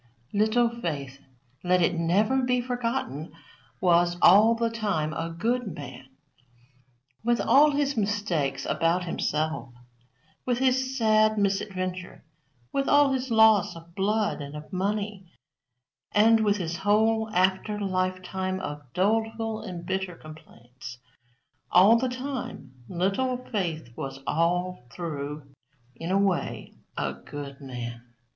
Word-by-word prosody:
Little 220 +3 +3
Faith, 150 - -5 0.4
let 180 0 +3
it 175 0 +2
never 195 +10 +2
be 250 0 +1
forgotten, 240 - -3 0.5
was, 175 0 +3
all 215 +7 +7
the 230 0 0
time, 200 -9 -1
a 165 +1 -3
good 220 +3 -2
man. 135 -2 -9 1.2
With 240 +1 +2
all 295 +2 +5
his 285 -1 0
mistakes 190 - -1
about 170 +2 +1
himself, 155 -4 -2 0.7
with 245 -1 0
his 260 +1 +1
sad 215 -2 +3
misadventure, 185 -2 -2 0.5
with 275 0 0
all 285 -1 +5
his 260 0 -2
loss 220 -5 +5
of 165 0 -13
blood 205 -1 0
and 140 +1 -7
of 150 +5 -10
money, 200 0 -2 0.9
and 225 +2 +5
with 210 -1 +2
his 170 -2 -3
whole 220 +2 +2
after 190 +3 +1
lifetime 185 -1 -2
of 150 -5 -5
doleful 220 +3 0
and 180 -5 -7
bitter 190 -1 -2
complaints, 130 -6 -12 0.7
all 195 +6 +7
the 255 +2 +1
time, 250 - -6 0.2
Little 195 +9 0
Faith 170 - -4
was 135 +2 -6
all 175 0 0
through, 150 -3 -5 0.5
in 165 +7 -6
a 190 - +2
way, 195 -3 -1 0.2
a 70 -1 -1
good 140 - -9
man. 120 -3 -6
190 Hz, 125 wpm, -26 LUFS, 165-225 Hz, 1.2 s, all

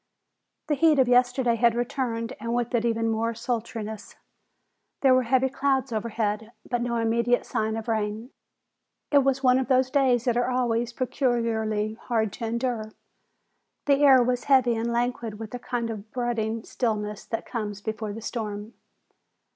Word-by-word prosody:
The 300 - 0
heat 305 +1 +4
of 260 -2 +4
yesterday 245 -1 +3
had 235 0 +3
returned 240 -1 -2
and 230 +2 -2
with 240 +1 -1
it 235 -1 +1
even 230 -1 +1
more 225 +1 -1
sultriness. 225 -2 -4 0.9
There 265 -2 +6
were 255 - +5
heavy 260 +1 +4
clouds 270 -1 0
overhead, 220 0 -2
but 245 -1 -1
no 240 0 -1
immediate 235 +1 +1
sign 220 -2 -1
of 225 +1 -5
rain. 220 +2 -2 0.8
It 285 - +6
was 270 0 +1
one 255 0 +5
of 265 - -2
those 260 -1 +2
days 260 -4 +3
that 240 -1 +1
are 245 +1 +1
always 240 -2 0
peculiarly 230 -4 -1
hard 220 -4 -1
to 230 - -5
endure. 230 -2 -2 0.9
The 280 0 +3
air 265 -3 +7
was 245 0 -1
heavy 255 -4 +4
and 230 +1 -1
languid 235 -2 -2
with 220 +1 -8
a 245 - -4
kind 240 -2 -3
of 215 -1 -8
brooding 230 -2 -2
stillness 210 -3 -2
that 225 -1 -4
comes 210 -4 -4
before 215 0 -4
the 225 +2 -7
storm. 215 -1 -5
235 Hz, 165 wpm, -26 LUFS, 220-250 Hz, 0.9 s, air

